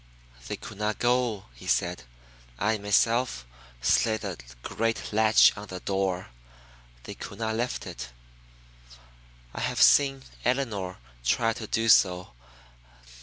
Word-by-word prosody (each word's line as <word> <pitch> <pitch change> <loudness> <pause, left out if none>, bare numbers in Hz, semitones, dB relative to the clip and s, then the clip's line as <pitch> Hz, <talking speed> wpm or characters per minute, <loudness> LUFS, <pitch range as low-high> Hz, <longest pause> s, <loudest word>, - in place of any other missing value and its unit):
"They - - -3
could 105 - -10
not 105 0 -1
go," 120 -4 +1
she - - -10
said. 65 - 0 0.5
"I 110 - 0
myself 105 - +1 0.4
slid 110 - +2
the 100 -4 -4 0.3
great 115 -1 -2
latch 110 0 +6
on 105 +1 -8
the 95 -1 -7
door; 95 -2 -2 0.7
they - - -7
could 100 - -9
not 110 0 -2
lift 120 +2 -2
it. 60 0 -7 1.4
I - - -6
have - - -1
seen 135 -2 +5 0.2
Elinor 115 -8 -1 0.3
try 115 - +2
to 110 -1 -7
do 115 +1 0
so. 90 - +4
110 Hz, 125 wpm, -27 LUFS, 95-115 Hz, 1.4 s, latch